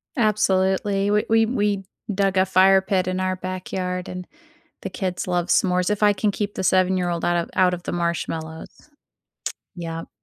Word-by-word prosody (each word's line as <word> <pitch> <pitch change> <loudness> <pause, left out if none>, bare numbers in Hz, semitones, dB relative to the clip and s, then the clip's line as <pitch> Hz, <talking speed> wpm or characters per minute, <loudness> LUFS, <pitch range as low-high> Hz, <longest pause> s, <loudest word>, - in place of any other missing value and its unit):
Absolutely, 195 -3 +1
we 210 0 +2
we 225 0 +4
we 210 -4 0 0.3
dug 195 0 +1
a 185 - +5
fire 190 +1 +5
pit 190 -2 0
in 185 0 -1
our 185 0 0
backyard 185 0 -4
and 180 0 -7 0.5
the - - -4
kids 185 -4 -3
love 175 -1 0
s'mores, 180 0 +2
if 210 0 0
I 205 0 +6
can 210 +1 0
keep 205 0 -3
the - - -3
7 185 0 +3
year 180 -1 0
old 170 -1 -2
out 175 0 +2
of - - -19
out 180 -1 +4
of 175 - -5
the - - -4
marshmallows. 165 -2 -3 1.1
Yep. 165 -1 -6
185 Hz, 180 wpm, -23 LUFS, 180-200 Hz, 1.1 s, I